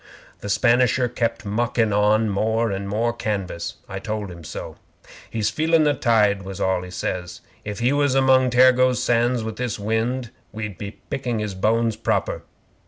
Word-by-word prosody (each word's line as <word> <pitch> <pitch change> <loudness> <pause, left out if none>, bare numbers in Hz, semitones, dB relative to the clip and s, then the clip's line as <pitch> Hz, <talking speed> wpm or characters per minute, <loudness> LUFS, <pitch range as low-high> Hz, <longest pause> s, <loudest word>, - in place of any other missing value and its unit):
'The - - -7
Spanisher 120 +3 +3
kept 115 -2 -2
muckin' 115 +1 0
on 105 +2 +3
more 110 +2 0
and 100 0 -4
more 115 +3 0
canvas. 100 -7 -3
I 95 - -5
told 105 -2 -4
him 85 -1 -11
so. - - -7 0.5
'"He's 110 -2 -1
feelin' 160 +1 +2
the 150 -1 +3
tide," 105 -6 +2
was 95 -1 -7
all 95 -1 +1
he 90 - -8
says. 90 0 -4 0.2
"If 105 0 -5
he 120 +4 +1
was 145 -2 +2
among 130 -1 +4
Tergoes 130 0 +5
Sands 120 0 +2
with 110 -1 -5
this 125 -3 -2
wind, 110 +4 -1 0.2
we'd 105 -4 -6
be 100 - -5 0.2
picking 125 -4 -2
his 105 -2 -3
bones 115 +3 +1
proper. 110 - -1
110 Hz, 170 wpm, -22 LUFS, 100-125 Hz, 0.5 s, Tergoes